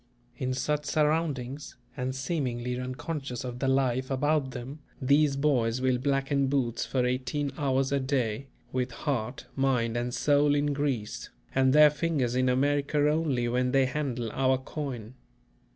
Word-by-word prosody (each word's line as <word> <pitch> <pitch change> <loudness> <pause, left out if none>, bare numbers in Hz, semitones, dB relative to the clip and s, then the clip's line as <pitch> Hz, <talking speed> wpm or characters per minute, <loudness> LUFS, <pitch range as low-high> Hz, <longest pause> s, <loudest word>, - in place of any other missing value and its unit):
In 130 -1 -2
such 150 +2 -1
surroundings, 150 -3 -1 0.2
and 130 -1 -3
seemingly 125 -4 -2
unconscious 130 0 -4
of 125 -1 -5
the 135 - 0
life 130 -1 +1
about 145 +1 +1
them, 130 +4 -7 0.2
these 140 +1 +3
boys 130 -5 +1
will 130 -1 +1
blacken 135 +1 +1
boots 130 -4 0
for 125 +1 +1
eighteen 130 +3 -1
hours 135 -2 0
a 140 - +2
day, 130 -2 -1 0.2
with 125 -1 -1
heart, 125 -2 -3
mind 125 -4 +1
and 120 +1 -1
soul 145 +3 +3
in 145 0 +1
Greece; 125 - -2 0.2
and 130 0 +3
their 150 +1 +7
fingers 150 -6 0
in 130 0 +2
America 140 +3 +1
only 145 -7 0
when 125 +1 0
they 135 -1 +4
handle 125 -4 -2
our 130 0 +2
coin. 130 -4 -6
130 Hz, 150 wpm, -28 LUFS, 125-145 Hz, 0.2 s, their